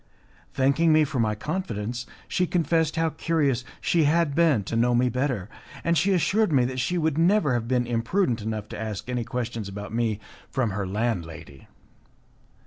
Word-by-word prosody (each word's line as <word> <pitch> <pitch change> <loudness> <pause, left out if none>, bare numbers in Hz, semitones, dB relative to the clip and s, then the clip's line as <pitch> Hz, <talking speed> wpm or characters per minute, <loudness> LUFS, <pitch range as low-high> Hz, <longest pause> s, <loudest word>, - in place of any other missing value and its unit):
Thanking 140 +5 +3
me 155 0 +5
for 140 -3 -2
my 110 -2 +1
confidence, 120 - -4 0.2
she 180 -1 0
confessed 165 -2 +1
how 165 -1 +1
curious 150 -6 0 0.2
she 165 -3 +2
had 160 0 +2
been 155 -9 +3
to 115 - -4
know 120 +1 +3
me 125 +1 +3
better, 125 -5 -1 0.4
and 170 - +2
she 180 +6 +2
assured 190 +3 +2
me 130 -4 +4
that 130 +1 -3
she 175 +8 0
would 160 -2 0
never 170 -5 +3
have 115 -1 -1
been 125 -1 +1
imprudent 120 - 0
enough 110 -1 -4
to - - -6
ask 110 -1 -5
any 125 -1 -1
questions 120 -4 -4
about 105 +2 -7
me 115 -3 0 0.3
from 125 -5 0
her 100 -1 -3
landlady. 85 - -4
125 Hz, 175 wpm, -25 LUFS, 115-160 Hz, 0.4 s, me